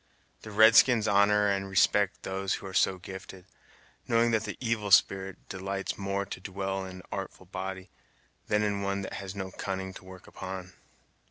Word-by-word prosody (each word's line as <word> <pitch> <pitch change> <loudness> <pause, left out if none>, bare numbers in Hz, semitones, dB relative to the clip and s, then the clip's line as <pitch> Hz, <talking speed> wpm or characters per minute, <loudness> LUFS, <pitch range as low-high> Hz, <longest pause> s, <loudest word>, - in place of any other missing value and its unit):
The 110 - -9
red 110 +2 +6
skins 115 -4 +6
honor 105 0 +4
and 100 -1 0
respect 100 +1 +2
them 95 +1 -4
who 95 - -1
are 95 - -7
so 95 0 +3
gifted, 95 0 -10 0.6
knowing 115 0 +3
that 110 -1 +1
the - - -5
Evil 115 -4 -1
Spirit 95 +1 +4
delights 95 +1 -4
more 100 0 -2
to 95 - -7
dwell 95 0 -3
in 95 0 -8
an 90 - -11
artful 95 -1 -6
body, 95 0 -6 0.6
than 105 0 +2
in 100 -1 0
one 100 0 -1
that - - -6
has 95 0 -6
no 95 -1 -5
cunning 95 0 -4
to - - -11
work 95 -1 -12
upon." 95 -1 -7
95 Hz, 180 wpm, -29 LUFS, 95-100 Hz, 0.6 s, red